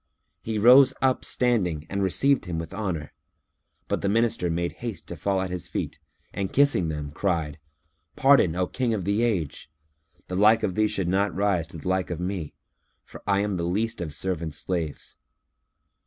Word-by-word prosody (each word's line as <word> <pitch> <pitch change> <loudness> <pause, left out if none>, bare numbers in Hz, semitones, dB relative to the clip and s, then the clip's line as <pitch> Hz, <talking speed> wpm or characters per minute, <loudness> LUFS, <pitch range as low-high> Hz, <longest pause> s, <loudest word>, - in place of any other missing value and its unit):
He 110 -1 -3
rose 130 +5 +7
up 130 -1 +1
standing 90 -11 0
and 100 +3 -2
received 135 +9 +2
him 85 -2 -4
with 80 +2 -6
honour; 90 -7 -4 0.7
but - - -1
the 100 - 0
Minister 115 -4 +1
made 85 +1 -1
haste 115 -4 -5
to - - -5
fall 100 -1 0
at 95 -1 -3
his 90 -3 -4
feet - - -4 0.3
and 95 -1 -3
kissing 140 - +3
them 75 -2 -4
cried, 80 -3 -2 0.6
"Pardon, 135 -12 +4
O 90 0 +1
King 120 +2 -1
of 95 -5 -4
the 100 +3 +1
Age! 95 -13 -1 0.6
The 90 - -4
like 110 +3 +5
of 100 -4 0
thee 110 +3 +2
should 100 -4 -1
not 95 -1 +1
rise 95 -4 +1
to 85 - -9
the 80 - -8
like 95 0 0
of 85 -2 -4
me, 90 -4 -4 0.5
for - - -12
I 100 -1 +3
am 100 -2 -1
the 85 - -2
least 110 +6 -1
of 75 -4 -4
servants' 85 -4 -2
slaves. 85 -5 -3
95 Hz, 185 wpm, -25 LUFS, 85-110 Hz, 0.7 s, rose